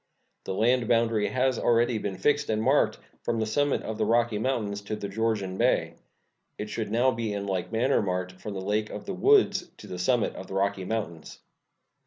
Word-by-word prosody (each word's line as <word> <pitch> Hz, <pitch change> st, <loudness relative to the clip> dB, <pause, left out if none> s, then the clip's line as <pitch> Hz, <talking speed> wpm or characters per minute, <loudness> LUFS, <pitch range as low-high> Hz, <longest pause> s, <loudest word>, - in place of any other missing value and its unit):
The 95 Hz, -, -3 dB
land 120 Hz, +3 st, +2 dB
boundary 115 Hz, -3 st, +2 dB
has 130 Hz, -1 st, +1 dB
already 120 Hz, -1 st, +2 dB
been 100 Hz, -2 st, -4 dB
fixed 145 Hz, +9 st, +1 dB
and 110 Hz, -1 st, +1 dB
marked 135 Hz, +6 st, +3 dB, 0.2 s
from 115 Hz, -, -1 dB
the 110 Hz, -, +1 dB
summit 145 Hz, +6 st, +1 dB
of 110 Hz, 0 st, -5 dB
the 110 Hz, -, +2 dB
Rocky 115 Hz, -1 st, +2 dB
Mountains 110 Hz, -5 st, -1 dB
to 105 Hz, +1 st, -4 dB
the 105 Hz, -1 st, -5 dB
Georgian 100 Hz, -2 st, -1 dB
Bay. -, -, +2 dB, 0.6 s
It 105 Hz, 0 st, -5 dB
should 110 Hz, -3 st, -3 dB
now 120 Hz, +4 st, +3 dB
be 115 Hz, -3 st, -3 dB
in 100 Hz, -1 st, -3 dB
like 95 Hz, -1 st, -2 dB
manner 120 Hz, +5 st, +2 dB
marked 90 Hz, -1 st, -3 dB
from 105 Hz, +1 st, -5 dB
the 95 Hz, -, -4 dB
Lake 105 Hz, +1 st, 0 dB
of 105 Hz, -, -7 dB
the 195 Hz, -, -4 dB
Woods 205 Hz, -, +3 dB
to -, -, -12 dB
the 90 Hz, -3 st, -7 dB
summit 120 Hz, +5 st, +1 dB
of 95 Hz, -, -8 dB
the 95 Hz, -, -6 dB
Rocky 100 Hz, -1 st, 0 dB
Mountains. 90 Hz, -6 st, -4 dB
110 Hz, 205 wpm, -27 LUFS, 100-120 Hz, 0.6 s, marked